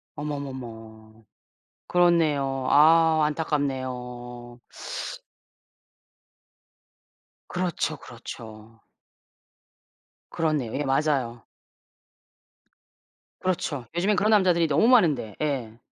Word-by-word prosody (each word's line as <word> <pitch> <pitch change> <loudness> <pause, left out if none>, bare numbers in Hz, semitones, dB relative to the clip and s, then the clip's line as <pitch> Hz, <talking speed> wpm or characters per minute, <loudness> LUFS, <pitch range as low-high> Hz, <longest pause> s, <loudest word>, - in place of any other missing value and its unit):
어머머머. 115 -7 -7 0.6
그렇네요. 150 -7 +2
아 160 +1 +6
안타깝네요. 125 -5 -3 2.9
그렇죠, 175 -3 -2
그렇죠. 115 -2 -11 1.5
그렇네요. 150 -8 -1
예 - - 0
맞아요. 135 -5 0 2.0
그렇죠. 155 -8 -2
요즘엔 195 +4 +2
그런 210 +4 +2
남자들이 180 -5 +4
너무 150 +10 +3
많은데. 160 - +3
예. 125 -7 -2
140 Hz, 175 characters per minute, -25 LUFS, 120-160 Hz, 2.9 s, 아